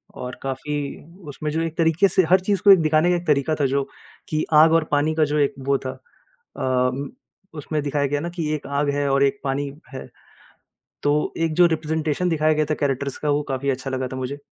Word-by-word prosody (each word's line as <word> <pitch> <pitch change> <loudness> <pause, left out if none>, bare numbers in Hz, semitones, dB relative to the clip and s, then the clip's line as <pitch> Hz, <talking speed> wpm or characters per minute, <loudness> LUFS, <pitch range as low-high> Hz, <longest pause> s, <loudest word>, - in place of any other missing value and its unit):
और 125 0 -6
काफ़ी 135 +2 -4 0.6
उसमें 150 +2 -5
जो 160 +2 -1
एक 165 -1 -4
तरीके 165 +4 +3
से 185 0 +2
हर 185 +1 +6
चीज़ 195 0 0
को 200 -1 +9
दिखाने 155 0 +2
का 180 - +3
एक 175 - -4
तरीका 150 +1 +2
था - - +3
जो 140 +1 0 0.5
कि 155 0 0
आग 160 +2 +7
और 165 -1 +4
पानी 145 +2 +2
का 160 - +3
जो 150 +1 -1
एक 140 - +2
वो 140 -1 +3
था 130 - -2 0.7
अम 130 +1 0 0.5
उसमें 150 +1 -3
दिखाया 145 0 0
गया 145 +1 -1
न 170 - -3
कि 165 -3 -2
एक 145 - -8
आग 140 +1 0
है 145 0 0
और 140 0 +3
एक 140 0 +1
पानी 140 +1 -1 0.2
है। 130 - -7 1.0
तो 145 - +3 0.3
एक 165 -1 0
जो 175 +2 +6
रिप्रेजेंटेशन 160 +1 -1
दिखाया 155 -2 +2
गया 155 0 +1
था 155 - +3
कैरेक्टरस 140 -1 -1
का, 150 - -1
वो 145 +1 +1
काफ़ी 135 +1 -1
अच्छा 135 0 -4
लगा 130 -1 -2
था 130 - -7
मुझे, 130 +2 -4
150 Hz, 220 wpm, -22 LUFS, 140-160 Hz, 1.0 s, को